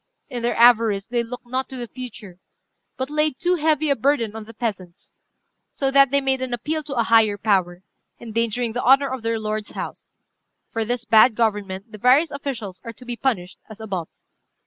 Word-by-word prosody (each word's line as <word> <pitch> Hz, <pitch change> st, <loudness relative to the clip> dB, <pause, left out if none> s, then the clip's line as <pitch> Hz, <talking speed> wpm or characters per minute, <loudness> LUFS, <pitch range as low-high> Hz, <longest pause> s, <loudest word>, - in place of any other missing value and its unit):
In 245 Hz, -2 st, -4 dB
their 240 Hz, +1 st, 0 dB
avarice 225 Hz, -4 st, +5 dB
they 240 Hz, 0 st, -1 dB
looked 245 Hz, +2 st, -8 dB
not 255 Hz, +2 st, -3 dB
to 265 Hz, -, -7 dB
the 240 Hz, -1 st, -5 dB
future, 210 Hz, -7 st, -10 dB, 0.6 s
but 260 Hz, +2 st, -3 dB
laid 300 Hz, -2 st, +1 dB
too 355 Hz, +2 st, +1 dB
heavy 310 Hz, -3 st, +1 dB
a -, -, +3 dB
burden 235 Hz, -4 st, 0 dB
on 220 Hz, -1 st, -7 dB
the 230 Hz, -, -12 dB
peasants, 200 Hz, -7 st, -5 dB, 0.6 s
so 270 Hz, -1 st, -1 dB
that 275 Hz, -1 st, +6 dB
they 280 Hz, +1 st, +2 dB
made 265 Hz, -1 st, 0 dB
an 255 Hz, -2 st, -2 dB
appeal 310 Hz, +6 st, -3 dB
to 280 Hz, -2 st, -5 dB
a 235 Hz, -, +2 dB
higher 220 Hz, -2 st, +4 dB
power, 190 Hz, -4 st, 0 dB, 0.4 s
endangering 230 Hz, 0 st, -2 dB
the 245 Hz, -, -2 dB
honour 275 Hz, +2 st, +5 dB
of 260 Hz, -2 st, -4 dB
their 230 Hz, 0 st, -1 dB
lord's 215 Hz, -1 st, -3 dB
house. -, -, -7 dB, 0.6 s
For 225 Hz, -, -1 dB
this 245 Hz, +2 st, -3 dB
bad 220 Hz, +1 st, +6 dB
government 205 Hz, -2 st, -2 dB
the 215 Hz, -, -10 dB
various 270 Hz, +7 st, +4 dB
officials 245 Hz, -10 st, -5 dB
are 230 Hz, -, -7 dB
to 250 Hz, -, -15 dB
be 245 Hz, -1 st, -4 dB
punished 210 Hz, -8 st, -2 dB
as 215 Hz, 0 st, -11 dB
above." 190 Hz, -7 st, -4 dB
235 Hz, 195 wpm, -22 LUFS, 215-265 Hz, 0.6 s, that